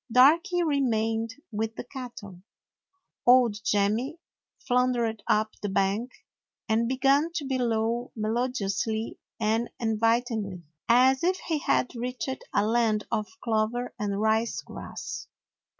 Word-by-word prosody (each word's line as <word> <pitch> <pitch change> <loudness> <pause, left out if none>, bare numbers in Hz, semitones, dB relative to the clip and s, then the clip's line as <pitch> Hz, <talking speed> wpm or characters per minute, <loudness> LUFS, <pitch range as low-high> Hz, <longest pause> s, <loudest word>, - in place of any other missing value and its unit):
Darky 325 +8 +5
remained 230 -6 0 0.2
with 220 +1 -2
the - - -5
cattle. 235 -8 -9 0.9
Old 240 -4 +5
Jemmy 215 +9 +1 0.5
floundered 245 -3 +1
up 215 +1 +2
the 205 - -2
bank 195 +6 0 0.6
and 225 +1 +2
began 275 +5 +3
to 305 -5 -2
bellow 240 -2 0
melodiously 220 -1 -1 0.2
and 225 +2 +1
invitingly, 225 -4 0 0.3
as 260 +3 +5
if 370 +2 +2
he 320 -3 -2
had 260 - +1
reached 250 +2 -4 0.2
a 205 - +2
land 220 -2 +2
of 215 -2 0 0.2
clover 230 +2 0
and 200 -1 -1
rice 220 +2 +1
grass. - - -7
230 Hz, 115 wpm, -27 LUFS, 215-255 Hz, 0.9 s, Darky